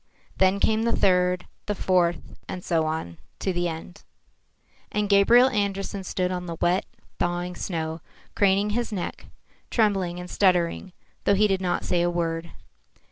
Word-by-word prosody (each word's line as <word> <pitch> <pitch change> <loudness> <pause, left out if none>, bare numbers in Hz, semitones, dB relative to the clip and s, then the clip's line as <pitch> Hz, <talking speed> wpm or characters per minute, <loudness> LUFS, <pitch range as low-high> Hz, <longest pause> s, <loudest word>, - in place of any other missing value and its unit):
Then 190 +1 +3
came 220 +2 +2
the 235 +1 +1
third, 180 -1 +2 0.2
the 205 - -1
fourth, 175 -3 +1 0.2
and 180 -1 -5
so 160 -3 +1
on, 155 - -4 0.2
to 190 - -1
the 175 0 0
end. 170 +3 -7 0.9
And 210 0 0
Gabriel 230 +6 +6
Andersen 200 -3 -2
stood 180 0 -1
on 180 -1 -4
the 165 -1 -5
wet, 180 +2 +1 0.3
thawing 175 +1 -1
snow, 160 -3 -3 0.3
craning 200 +1 +2
his 235 +2 -1
neck, 190 -4 -5 0.4
trembling 195 -6 +1
and 180 - -7
stuttering, 180 -1 +1 0.3
though 200 - +4
he 210 +2 +4
did 195 -2 +1
not 180 -1 -1
say 175 - +1
a 175 - +2
word. 170 -1 -2
180 Hz, 155 wpm, -25 LUFS, 175-200 Hz, 0.9 s, Gabriel